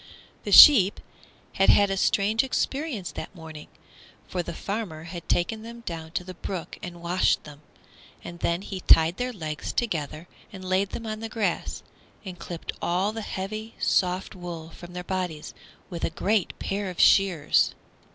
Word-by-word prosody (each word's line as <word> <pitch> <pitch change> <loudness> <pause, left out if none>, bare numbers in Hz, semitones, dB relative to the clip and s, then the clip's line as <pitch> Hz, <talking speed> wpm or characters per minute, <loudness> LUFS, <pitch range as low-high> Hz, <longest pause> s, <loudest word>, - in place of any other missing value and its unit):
The - - -3
sheep 210 -10 +9 0.5
had 195 - +3
had 200 -1 +5
a - - 0
strange 205 +4 +2
experience 265 - -2
that - - -8
morning, 160 -3 -10 0.6
for 180 - -2
the 170 - -6
farmer 195 -7 -4
had 175 0 -9
taken 215 +6 0
them 235 +1 -10
down 165 -6 -6
to 180 - -2
the 185 0 -8
brook 180 -1 -6
and 175 -1 -8
washed 175 +2 +1
them, 150 -1 -13 0.6
and 175 0 -9
then 170 +3 -1
he 195 -2 -6
tied 165 -1 +5
their 250 0 -2
legs 155 - -5
together 160 - -3 0.2
and 190 -2 -9
laid 190 +1 +1
them 230 - -6
on 215 -1 -4
the 225 0 -5
grass 210 -6 -2 0.4
and 185 -2 -8
clipped 170 -2 -6
all 185 +4 0
the 225 +1 -5
heavy, 215 +3 -5
soft 185 +2 0
wool 170 -3 -8
from 175 +2 -12
their 180 0 -5
bodies 180 -5 -4 0.4
with 170 - -6
a - - +1
great 195 +4 0
pair 195 0 -3
of 180 - -8
shears. 180 -7 +4
185 Hz, 170 wpm, -26 LUFS, 170-210 Hz, 0.6 s, sheep